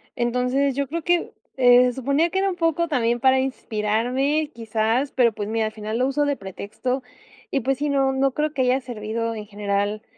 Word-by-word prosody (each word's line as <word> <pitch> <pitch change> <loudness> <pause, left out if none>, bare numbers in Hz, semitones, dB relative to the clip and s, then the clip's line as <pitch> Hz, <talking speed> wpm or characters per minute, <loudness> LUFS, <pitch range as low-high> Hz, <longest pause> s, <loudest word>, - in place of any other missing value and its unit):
Entonces, 250 +3 0
yo 280 -1 -1
creo 335 +4 -3
que, 350 -1 +1 0.3
eh, 250 0 +6
se 250 - 0
suponía 280 +6 +1
que 380 - -3
era 390 0 +2
un - - -5
poco 335 0 +1
también 240 -5 +1
para 265 0 +4
inspirarme, 260 +5 -1
quizás, 225 +4 0
pero, 235 -4 +3
pues 205 0 -5
mira, 225 0 0
al 215 - -3
final 215 +1 -4
lo 255 - +2
uso 290 +2 +1
de 285 -1 0
pretexto, 205 +7 -4 0.5
y 275 - 0
pues, 270 +2 -1
sí, 295 0 0
no 270 -1 +2
no 265 0 +1
creo 300 0 -1
que 265 - -1
haya 255 +2 +2
servido 230 -2 -4
en 210 -1 -7
general, 205 0 -2
250 Hz, 205 wpm, -23 LUFS, 225-280 Hz, 0.5 s, eh